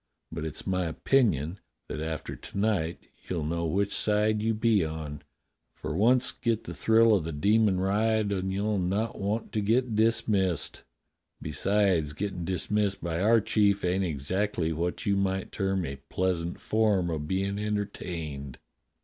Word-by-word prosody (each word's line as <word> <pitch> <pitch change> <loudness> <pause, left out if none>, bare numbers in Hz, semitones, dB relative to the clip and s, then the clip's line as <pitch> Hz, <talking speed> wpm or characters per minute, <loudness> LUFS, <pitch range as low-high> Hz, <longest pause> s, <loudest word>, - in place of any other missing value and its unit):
But 80 -1 -4
it's 80 -1 -5
my 90 -1 0
opinion 85 - +1 0.3
that - - -5
after 80 -1 -4
to - - -10
night 100 -6 -1 0.2
you'll 85 -4 -2
know 85 +1 -1
which 100 +5 0
side 105 0 +2
you 110 0 +1
be 110 -3 +3
on, 80 -2 -5 0.5
for 75 - -5
once 120 +6 +4
get 115 -2 -1
the - - -7
thrill 115 0 +4
of 95 -5 +2
the 80 - -4
demon 100 +5 +3
ride 105 +2 +1
and 95 -1 -1
you'll 100 +1 0
not 100 +5 -1
want 105 +3 -2
to 105 - -1
get 115 +3 +1
dismissed. 105 -5 +1 0.6
Besides, 90 -1 +1
gettin' 90 +1 -4
dismissed 100 +2 0
by 85 0 -2
our 115 +2 +5
chief 100 -2 +2
ain't 90 +2 +1
exactly 85 +2 -1
what 85 +3 -2
you 100 - +2
might 95 -1 -1
term 95 -2 -1
a 70 -2 -5
pleasant 90 -2 -1
form 105 -5 +1
of 75 -2 -3
bein' 100 +2 -1
entertained." 85 -10 -4
95 Hz, 155 wpm, -28 LUFS, 85-105 Hz, 0.6 s, our